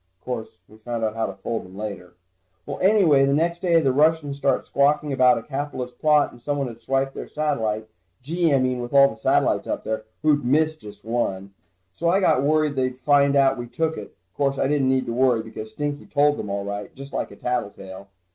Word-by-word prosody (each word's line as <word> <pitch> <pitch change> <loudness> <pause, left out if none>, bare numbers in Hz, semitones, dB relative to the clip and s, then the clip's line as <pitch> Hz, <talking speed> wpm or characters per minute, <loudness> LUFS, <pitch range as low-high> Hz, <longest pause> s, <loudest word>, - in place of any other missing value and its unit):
Course, 115 -3 -6
we 110 - -17
found 115 0 -4
out 110 -1 0
how 115 - -1
to 95 - -7
fold 110 +4 -4
them 95 +1 -13
later. 100 -4 -7 0.5
Well, - - -6
anyway 185 -9 +4
the 140 0 +2
next 170 +3 0
day, 170 -3 +4
the 135 -5 +1
Russians 150 0 +2
started 140 -1 0
squawking 145 +1 +1
about 130 -2 +4
a 115 - -5
capitalist 135 -3 -5
plot, 150 -2 +3
and 120 - -16
someone 145 +1 -2
had 115 -1 -10
swiped 135 +3 -1
their - - -7
satellite. 110 -8 -2 0.4
Gee, 165 +3 0
I 140 - +4
mean 130 -1 0
with 120 +3 -5
all 140 0 +7
the 110 - -9
satellites 110 - +1
up - - -3
there, 110 0 -3 0.2
who'd 150 -2 +3
miss 155 +5 +2
just 105 -8 -13
one? 100 -4 -2 0.4
So 170 - -1
I 190 +3 +3
got 160 -8 +3
worried 155 +1 +2
that - - +2
they'd 130 0 -2
find 140 0 +3
out 135 -1 +4
that - - -8
we 120 - -5
took 160 +7 -1
it. 105 - -9 0.2
Course, 140 -1 0
I - - +1
didn't 140 -2 +1
need 130 0 +1
to 115 - -3
worry, 125 -2 +2
because 110 -1 -8
Stinky 145 +4 -4
told 145 0 +2
them 105 - -5
all 100 0 -3
right, 100 0 -5
just 135 +1 -10
like - - -2
a - - -12
tattletale. 100 -5 -5
135 Hz, 225 wpm, -23 LUFS, 115-145 Hz, 0.5 s, all